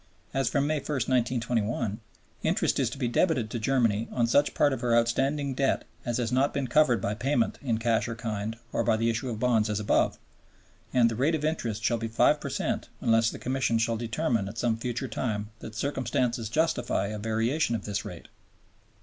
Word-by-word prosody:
As 135 -3 +1
from 140 +2 +1
May 155 +1 +1
1, - - -10
1921, 120 -4 0 0.4
interest - - +1
is - - +2
to - - -8
be 130 -3 0
debited 120 -3 +1
to 120 - -2
Germany 115 -3 +1
on 120 - +1
such 145 +5 +2
part 145 -2 +3
of - - -4
her 120 -1 +3
outstanding 135 +4 +1
debt 135 +1 0 0.2
as 120 -1 0
has 120 -1 -1
not 130 +3 +2
been 140 -1 0
covered 125 -2 +4
by 100 - -1
payment 120 +1 0
in 120 -5 0
cash 115 0 +1
or 115 - -4
kind 110 -1 -4 0.2
or - - +1
by 115 -2 +2
the 115 +1 +2
issue 120 +3 -3
of 110 -3 -4
bonds 115 -3 +2
as 105 0 -1
above, 105 - +2 0.7
and 125 -2 +4
"the - - -3
rate 145 +8 +2
of 150 -1 -2
interest 115 -9 -2
shall 120 0 +1
be 115 - -2
5 110 - +3
per - - -4
cent - - -2
unless 115 0 +3
the - - -7
Commission 130 -2 0
shall 115 +1 +1
determine 115 -1 -1
at 110 - -10
some 115 -1 +1
future 120 +3 -3
time 105 -4 -3
that 110 - -9
circumstances 125 -3 -1
justify 155 -8 0
a 105 0 -5
variation 115 +5 0
of 105 - -5
this 105 -1 -2
rate." - - -9
120 Hz, 205 wpm, -28 LUFS, 115-130 Hz, 0.7 s, covered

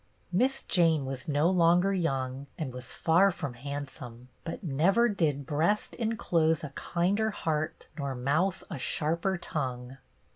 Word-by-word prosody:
Miss 255 +9 +1
Jane 165 -6 +3
was 130 -1 -5
no 150 +2 +2
longer 180 +2 +4
young 135 -6 -1
and 140 -6 -4
was 125 0 -8
far 175 +4 +4
from 160 -8 -4
handsome, 130 -2 -7
but 165 +5 -6
never 180 - +3
did 155 - 0
breast 160 +8 0
enclose 170 -9 +1
a 150 - -4
kinder 185 +9 0
heart 155 -6 -2
nor 140 -2 -2
mouth 155 +10 0
a 160 - -4
sharper 170 +8 0
tongue. 130 -5 -4
160 Hz, 140 wpm, -29 LUFS, 135-180 Hz, -, longer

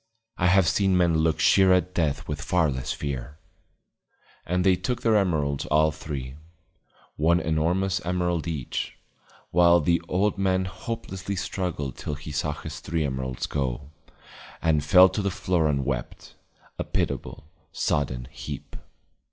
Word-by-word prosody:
I 90 - +1
have 95 -1 +4
seen 95 0 +2
men 85 -3 +3
look 80 -1 +1
sheer 95 +3 +5
at 90 0 +2
Death 80 -5 -1
with 75 -1 -4
far 85 -1 +2
less 65 -1 -3
fear. 70 +1 -5 1.1
And 90 +2 +1
they 95 -1 +5
took 100 +7 -3
their 115 -2 +4
emerald 80 -8 +1
all 80 +1 +4
three, 70 -3 -6 0.8
one 85 +3 +3
enormous 90 +5 0
emerald 90 -2 -1
each, 75 -7 -4 0.5
while 85 0 +6
the 85 +1 +2
old 100 +2 0
man 95 -1 +1
hopelessly 95 +1 -5
struggled 90 -8 -3
till 75 - -4
he 75 +1 -8
saw 75 0 -1
his - - -8
three 80 -2 -2
emeralds 65 -2 -3
go, 70 0 -3 0.7
and 75 -3 +2
fell 90 +4 +7
to 95 +3 -2
the 100 - 0
floor 90 -3 0
and 70 -3 0
wept, 65 -3 -4 0.5
a - - 0
pitiable, - - -3 0.3
sodden 65 -4 -1
heap. - - -8
80 Hz, 145 wpm, -25 LUFS, 75-90 Hz, 1.1 s, fell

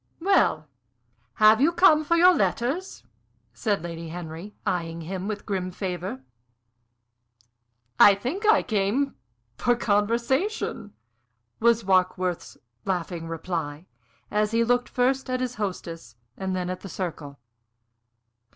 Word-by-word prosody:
"Well, 330 - +2 0.7
have 215 +2 +6
you 310 +4 +5
come 340 -3 +5
for 335 +3 +2
your 360 +2 +7
letters?" 295 +7 -1 0.5
said 205 -7 -1
Lady 165 -1 -6
Henry, 170 +4 -8
eying 170 -2 -2
him 185 +3 -5
with 210 -1 -3
a - - -29
grim 190 -3 -2
favor. 180 -7 -5 1.8
"I 200 - +8
think 265 - -4
I 435 - +5
came 220 +6 0 0.4
for 245 - +2
conversation," 235 - 0 0.7
was 235 0 +3
Warkworth's 185 -1 0 0.3
laughing 175 -3 -3
reply, 165 -2 -4 0.5
as 210 0 +1
he 230 +1 +2
looked 245 +1 +1
first 260 +1 0
at 255 0 -1
his 255 -1 -2
hostess 165 - -5 0.2
and 190 -1 -3
then 180 0 -2
at 185 - -5
the 195 - -9
circle. 160 -6 -5
200 Hz, 125 wpm, -25 LUFS, 175-245 Hz, 1.8 s, I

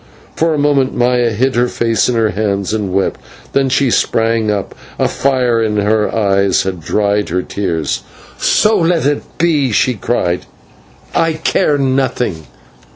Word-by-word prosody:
For 165 -1 +1
a - - -2
moment 145 -2 +1
Maya 120 -1 +2
hid 125 +5 0
her 120 +1 +2
face 115 -3 0
in 125 - 0
her 110 -2 +2
hands 100 -1 -1
and 105 -4 -2
wept; 95 +1 -1 0.3
then 135 -1 +2
she 135 -1 +2
sprang 115 -1 +1
up, 100 -2 -2 0.2
and - - +1
a - - +3
fire 125 -4 +1
in 105 -1 0
her 105 +1 +1
eyes 100 -3 +2
had 95 -2 -4
dried 105 +4 0
her 90 +2 -1
tears. 85 -6 -2 0.4
"So 215 -1 +3
let 165 -3 +1
it 145 0 +1 0.2
be," 150 -6 +1
she 125 +4 +2
cried, 90 -5 -2 0.7
"I 165 -1 +2
care 150 -1 +1
nothing. 130 - -1
115 Hz, 160 wpm, -15 LUFS, 100-135 Hz, 0.7 s, a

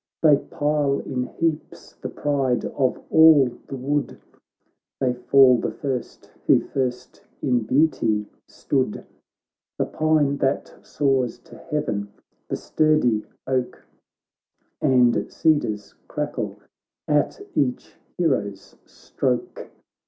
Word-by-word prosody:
They 150 -3 +7
pile 145 -1 0
in 125 -2 -2
heaps 165 -2 -3
the - - -7
pride 135 -4 0
of 130 -3 -1
all 155 -6 +6
the - - -6
wood; 140 +3 -2 0.8
They 130 -2 +1
fall 125 0 +5
the - - -2
first, 130 -4 -5 0.2
who - - +6
first 125 -2 -4 0.2
in 125 -5 +1
beauty 115 -6 +2 0.2
stood: 130 -6 -2 0.7
The - - +1
pine 155 -3 +1
that 135 0 -1
soars 135 -4 0
to - - -15
heaven, 105 -10 -2 0.4
the - - -2
sturdy 155 -9 +1 0.2
oak, 130 -1 -2 1.0
And 125 -2 +3
cedars 145 -11 0
crackle - - -4 0.5
at 150 - +1
each 125 -3 -1 0.2
hero's 100 - -1
stroke. 125 -2 -3
135 Hz, 105 wpm, -23 LUFS, 125-150 Hz, 1.0 s, They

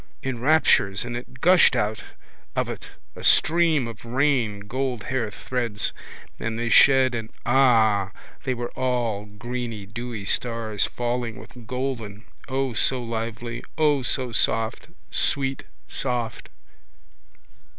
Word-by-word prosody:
in 130 -3 -3
raptures 125 -9 +3
and 120 -1 -4
it 125 +1 -8
gushed 180 -6 +6
out 110 -2 -1 0.5
of - - 0
it - - -7 0.3
a - - -9
stream 160 -5 +4
of 115 -1 -9
rain 120 -4 +1
gold 125 +2 -3
hair 125 -4 -1
threads 115 +1 -3 0.5
and 115 0 -3
they 120 0 -1
shed 130 +1 +6
and 115 -2 -4 0.2
ah! 115 -6 +4 0.3
they 130 -2 -1
were 120 0 -4
all 120 -5 -1
greeny 115 0 -5
dewy 115 0 -6
stars 115 -2 0
falling 120 -2 -3
with 120 -3 -13
golden, 120 -5 -4 0.2
O 135 -1 -1
so 130 +3 +2
lovely, 115 0 -4
O, 150 -3 +3
soft, 120 -2 0 0.2
sweet, 135 -1 +2 0.2
soft! 120 -4 -3
120 Hz, 120 wpm, -24 LUFS, 110-130 Hz, 0.5 s, gushed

